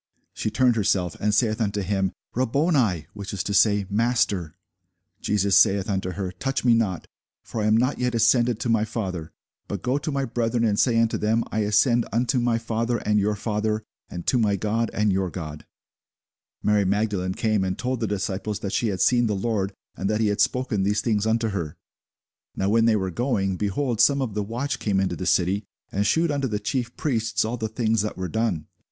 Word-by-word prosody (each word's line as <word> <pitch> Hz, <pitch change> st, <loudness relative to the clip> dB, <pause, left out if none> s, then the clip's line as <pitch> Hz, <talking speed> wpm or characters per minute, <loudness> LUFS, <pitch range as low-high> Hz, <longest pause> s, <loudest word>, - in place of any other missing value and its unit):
She -, -, -2 dB
turned 125 Hz, 0 st, +2 dB
herself, 95 Hz, -5 st, +1 dB
and 105 Hz, -, +1 dB
saith 110 Hz, +1 st, +1 dB
unto 105 Hz, -1 st, 0 dB
him, 95 Hz, -1 st, 0 dB, 0.2 s
Rabboni; 130 Hz, -, +1 dB
which 100 Hz, -1 st, -7 dB
is 90 Hz, -, -2 dB
to 100 Hz, -, -3 dB
say, 100 Hz, 0 st, +4 dB
Master. 100 Hz, -6 st, 0 dB, 0.7 s
Jesus 100 Hz, -2 st, +1 dB
saith 100 Hz, +1 st, +4 dB
unto 95 Hz, -1 st, -2 dB
her, 95 Hz, -1 st, -4 dB
Touch 135 Hz, +6 st, -3 dB
me 120 Hz, -, +6 dB
not; 105 Hz, -7 st, 0 dB, 0.4 s
for 110 Hz, -, -4 dB
I 105 Hz, -, +1 dB
am 110 Hz, +1 st, +4 dB
not 125 Hz, +4 st, +1 dB
yet 125 Hz, -1 st, 0 dB
ascended 115 Hz, 0 st, +3 dB
to -, -, -1 dB
my 115 Hz, -2 st, +2 dB
Father: 95 Hz, -8 st, -4 dB, 0.4 s
but 100 Hz, -3 st, -5 dB
go 130 Hz, +3 st, +1 dB
to 155 Hz, -, -3 dB
my 140 Hz, -1 st, -1 dB
brethren, 115 Hz, 0 st, -1 dB
and 105 Hz, -3 st, +1 dB
say 115 Hz, -3 st, +3 dB
unto 115 Hz, -1 st, +1 dB
them, 110 Hz, +2 st, +1 dB
I 110 Hz, -, -1 dB
ascend 115 Hz, +3 st, +3 dB
unto 125 Hz, +4 st, +1 dB
my 120 Hz, -1 st, +1 dB
Father, 115 Hz, +1 st, -1 dB
and 105 Hz, -1 st, +1 dB
your 105 Hz, +1 st, +1 dB
Father; 105 Hz, +1 st, -1 dB, 0.3 s
and 85 Hz, -1 st, -7 dB
to 125 Hz, -, +2 dB
my 105 Hz, -3 st, +2 dB
God, 110 Hz, +4 st, -1 dB
and 105 Hz, -1 st, +1 dB
your 95 Hz, -1 st, 0 dB
God. 75 Hz, -4 st, -7 dB, 1.0 s
Mary 105 Hz, -1 st, +3 dB
Magdalene 100 Hz, -2 st, 0 dB
came 110 Hz, -3 st, +1 dB
and 95 Hz, 0 st, -2 dB
told 130 Hz, 0 st, -2 dB
the 115 Hz, -, -1 dB
disciples 100 Hz, +1 st, -3 dB
that 100 Hz, -, -4 dB
she 120 Hz, -, +1 dB
had 95 Hz, -4 st, -2 dB
seen 120 Hz, -1 st, +4 dB
the 105 Hz, -, 0 dB
Lord, 100 Hz, -1 st, -1 dB, 0.2 s
and 95 Hz, -, -2 dB
that 110 Hz, 0 st, 0 dB
he 110 Hz, -2 st, +2 dB
had 105 Hz, 0 st, 0 dB
spoken 125 Hz, -4 st, +1 dB
these 105 Hz, +2 st, +1 dB
things 110 Hz, -2 st, 0 dB
unto 115 Hz, 0 st, +1 dB
her. 85 Hz, -7 st, -4 dB, 0.8 s
Now 95 Hz, -, 0 dB
when 115 Hz, +2 st, +4 dB
they 115 Hz, -1 st, +4 dB
were 95 Hz, -3 st, -1 dB
going, 100 Hz, -4 st, 0 dB
behold, 110 Hz, +5 st, -1 dB
some 140 Hz, +4 st, +4 dB
of 130 Hz, -6 st, -2 dB
the 105 Hz, -, -1 dB
watch 120 Hz, +7 st, -3 dB
came 100 Hz, -3 st, 0 dB
into 95 Hz, -1 st, 0 dB
the 95 Hz, -, -4 dB
city, 95 Hz, +3 st, +2 dB, 0.3 s
and 100 Hz, +1 st, 0 dB
shewed 165 Hz, +5 st, +2 dB
unto 140 Hz, -2 st, 0 dB
the 105 Hz, -3 st, -2 dB
chief 120 Hz, +3 st, -3 dB
priests 115 Hz, -7 st, 0 dB
all 115 Hz, +3 st, -2 dB
the 110 Hz, -1 st, -3 dB
things 110 Hz, -1 st, +1 dB
that 105 Hz, -, -4 dB
were 95 Hz, 0 st, -3 dB
done. 110 Hz, -8 st, -1 dB
110 Hz, 210 wpm, -24 LUFS, 100-115 Hz, 1.0 s, me